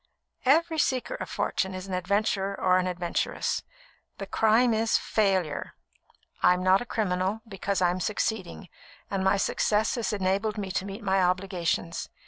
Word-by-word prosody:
"Every 320 +3 +3
seeker 260 - 0
of - - -5
fortune 190 -1 -1
is 185 0 -6
an 190 - -5
adventurer 195 +1 0
or 185 0 +4
an 185 - -1
adventuress. 175 -1 -1 0.6
The - - -5
crime 225 +2 +3
is, 220 +1 +2
failure. 190 -8 0 0.7
I'm 180 0 +4
not 185 +2 +4
a 245 - -6
criminal, 195 0 -1
because 195 -2 -2
I 175 - +4
am 180 - -3
succeeding, 200 -1 -2 0.4
and 195 -1 -1
my 190 +1 +3
success 210 +2 +1
has 235 -3 -1
enabled 200 +2 0
me 195 -2 -3
to 190 - -2
meet 200 +3 -7
my 190 -1 +2
obligations. 180 -2 -1
195 Hz, 155 wpm, -27 LUFS, 185-215 Hz, 0.7 s, or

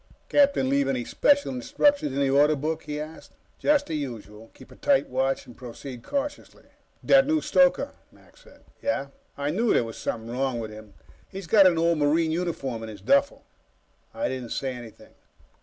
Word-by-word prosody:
"Captain 280 - +3
leave 140 +1 +1
any 125 -3 -1
special 285 -1 +2
instructions 285 - +1
in 135 - -3
the 140 - +2
Order 145 +2 +4
Book?" 155 +3 -3
he 150 0 -4
asked. 155 +1 -9 0.3
"Just 295 -1 +2
the 165 - -6
usual. 115 -7 -6
Keep - - -16
a - - -13
tight 280 -2 +2
watch 135 +1 -1
and 120 - -14
proceed 125 0 -9
cautiously." 285 - -5 0.4
"That 270 0 +5
new 315 +1 +2
stoker," - - +2 0.2
Mac - - -22
said. - - -19 0.2
"Yeah?" 140 - -1 0.3
"I 145 +1 -1
knew 220 +7 +1
there - - +3
was 115 -1 -8
something 115 0 -4
wrong 130 -1 -1
with 110 -1 -6
him. 110 -1 -13 0.3
He's 195 -1 -8
got 195 +2 +6
an 175 -2 +2
old 165 -1 +2
Marine 160 +2 +2
uniform 160 -9 -3
in 110 - -7
his 105 - -10
duffel." 280 0 +2 0.7
I 290 - -2
didn't 125 -3 -5
say 135 -2 -3
anything. 120 -3 -12
145 Hz, 185 wpm, -25 LUFS, -, 0.7 s, got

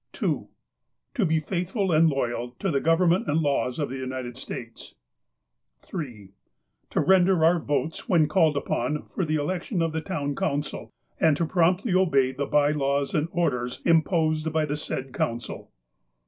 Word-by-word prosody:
"2. - - -1 0.7
To 240 -8 +1
be 160 0 +2
faithful 185 +4 -2
and 160 +1 +5
loyal 120 -3 -2
to - - -1
the 140 - +1
Government 170 +2 +3
and 150 +2 +2
laws 140 -4 0
of 145 -3 -2
the 135 - -5
United 130 -2 -5
States. 120 -2 -8 0.5
" - - -55
3. 120 - -7 0.6
To - - -1
render 185 -3 +4
our 170 +1 +4
votes 155 +1 -2
when 165 -5 +4
called 155 -2 +3
upon 140 +1 -1
for 190 - -4
the 155 -1 0
election 175 +6 -2
of 165 - 0
the 160 0 -2
Town 145 -5 -3
Council, 145 -4 -3 0.3
and 155 -3 +4
to 170 - +1
promptly 180 +5 +2
obey 140 -9 +3
the 140 +1 -3
by 145 0 +3
laws 140 -1 0
and 155 +1 +1
orders 125 -8 -1
imposed 160 -1 +2
by 155 0 +1
the 145 0 -2
said 135 -3 -5
Council. 120 +1 -3
155 Hz, 165 wpm, -26 LUFS, 135-170 Hz, 0.7 s, and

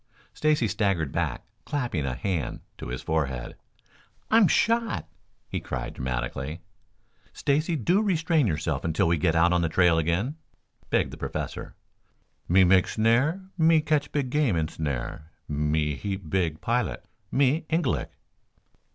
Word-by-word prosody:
Stacy 150 -6 +2
staggered 95 - 0
back, - - -2 0.2
clapping 120 - -2
a 65 - -2
hand 85 -7 -2 0.2
to - - -6
his 60 +1 -5
forehead. 65 -6 -2 0.8
"I'm 220 -3 +6
shot!" 230 - +1 0.4
he - - -3
cried 65 -2 -5
dramatically. 65 +5 -4 0.7
"Stacy, 155 +4 +1
do 175 - +2
restrain 165 - +2
yourself 80 -4 -1
until 80 0 +1
we 85 -1 +2
get 80 +1 +2
out 85 +2 +4
on 90 - +3
the 85 - +1
trail 85 0 +4
again," 90 - -1 0.5
begged - - +1
the - - -8
Professor. - - -5 0.7
"Me 95 +2 +6
make 95 0 +5
snare. 125 - +2
Me 160 0 +5
catch 150 -2 0
big 140 -4 -1
game 145 - +2
in 80 -1 0
snare. 75 +1 -4 0.2
Me 75 +1 0
heap 95 +3 -5
big 85 -4 0
pilot. 120 +5 -1 0.3
Me 140 +4 +2
Ingalik." 160 -4 0
95 Hz, 140 wpm, -26 LUFS, -, 0.8 s, I'm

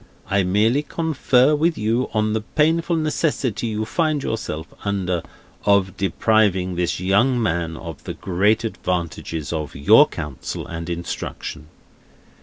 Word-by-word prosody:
I 100 0 +3
merely 105 +9 +2
confer 150 -3 +2
with 160 +3 +1
you, 115 +4 0
on 110 -1 +1
the 110 - 0
painful 165 +7 +1
necessity 150 - 0
you 110 0 -2
find 155 +1 0
yourself 80 -8 -3 0.2
under, 95 -4 -1 0.4
of 100 -2 +3
depriving 95 -1 +2
this 90 0 -1
young 100 +8 +3
man 85 -6 -1
of 80 -2 -9
the - - -5
great 105 +5 +1
advantages 85 - -3
of 75 -3 -4
your 70 +1 +6
counsel 70 -3 -6
and 85 0 -6
instruction." 85 -3 -5
105 Hz, 130 wpm, -22 LUFS, 85-125 Hz, 0.4 s, your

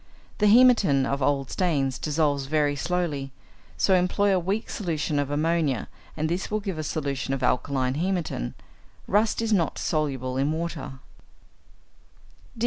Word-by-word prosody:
The 210 - +4
hæmatin 210 - +5
of 140 +1 -2
old 135 -1 0
stains 140 -8 0
dissolves 145 -3 0
very 145 -1 +1
slowly, 150 -4 -2 0.5
so 195 - +3
employ 190 +2 +2
a - - +2
weak 195 +6 -2
solution 160 -6 -2
of 140 -1 -1
ammonia, 150 -3 0 0.3
and 155 0 0
this 175 +4 -2
will 215 - 0
give 195 -6 -4
a - - -2
solution 140 -3 -2
of 130 - -5
alkaline 130 0 +1
hæmatin. 170 - -2 0.5
Rust 215 +3 +1
is 225 -1 +1
not 170 -6 +1
soluble 135 -5 -1
in 140 +3 +1
water. 160 -3 -4
155 Hz, 140 wpm, -25 LUFS, 140-180 Hz, 0.5 s, hæmatin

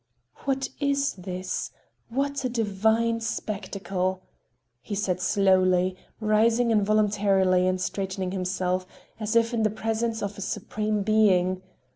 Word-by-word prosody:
"What 270 -1 0
is 280 -1 +1
this? 185 0 -4 0.4
What 280 +3 -1
a 255 - 0
divine 225 +1 +1
spectacle!" 190 -4 -3 0.6
he 205 - -5
said 185 -3 -1
slowly, 185 -2 +3 0.2
rising 225 +2 +3
involuntarily 200 -3 +3
and 185 0 +1
straightening 190 0 -3
himself, 185 -1 -1 0.3
as 215 +1 -2
if 230 +1 +3
in 230 - +1
the 215 - +3
presence 225 +1 -2
of 200 0 -4
a - - -6
supreme 210 +1 -2
being. 190 -4 +3
205 Hz, 120 wpm, -26 LUFS, 185-225 Hz, 0.6 s, slowly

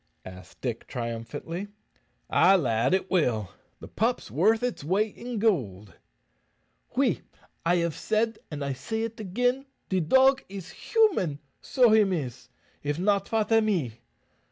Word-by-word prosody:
asked 90 0 -12
Dick, 120 -3 -4
triumphantly. 125 - -5 0.6
"Ay, 195 - +5
lad, 120 -8 +1
it 190 0 -3
will. 120 - +1 0.3
The - - -10
pup's - - -1
worth 215 - +3
its 245 -11 -2
weight 200 +7 0
in 245 -1 -6
goold." 105 - 0 1.0
"Oui, - - +2 0.4
I 170 +1 +3
have 170 -2 0
said, 225 +1 0
and 145 -2 -4
I 140 - -1
say 220 - -3
it 225 -1 -5
agen, 245 +7 0 0.2
de 190 - +1
dog 265 - +4
is 195 -3 -8
human, 375 - +1 0.2
so 250 -4 +3
him 215 -3 +5
is. 140 -9 -4 0.3
If 145 +1 -2
not, 200 +2 +1
fat 220 -1 0
am 225 -1 +4
he?" 135 - -1
185 Hz, 145 wpm, -27 LUFS, 135-220 Hz, 1.0 s, Ay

